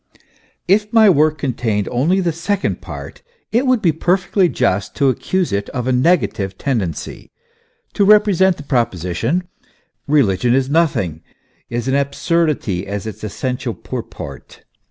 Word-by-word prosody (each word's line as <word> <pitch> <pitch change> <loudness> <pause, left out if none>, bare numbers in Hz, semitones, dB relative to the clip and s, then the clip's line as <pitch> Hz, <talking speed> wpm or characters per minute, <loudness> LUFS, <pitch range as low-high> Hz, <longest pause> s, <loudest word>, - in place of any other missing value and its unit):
If 210 +2 +2
my 220 -3 +6
work 155 -1 +3
contained 120 -7 -1
only 155 +10 +2
the 170 -3 0
second 190 +5 -2
part, - - -9 0.3
it 245 +4 +1
would 255 -4 +2
be 170 - +4
per 175 +4 +2
fectly 185 -1 +1
just 95 +1 0
to 140 -2 +3
accuse 175 - -1
it 100 0 -2
of 125 -2 -2
a 130 - +1
negative 125 - +1
tendency, 105 - -3 0.6
to 205 - +2
represent 200 -3 +4
the 145 - -9
proposition: 115 - -1 0.6
Eeligion 120 -5 +3
is 135 +1 0
nothing, 120 - +1 0.5
is 120 +1 -3
an 130 - +1
absurdity, 140 - 0
as 100 0 -4
its 110 -1 -7
essen 125 +4 -3
tial - - -4
purport. 70 -3 -8
140 Hz, 145 wpm, -18 LUFS, 110-180 Hz, 0.6 s, my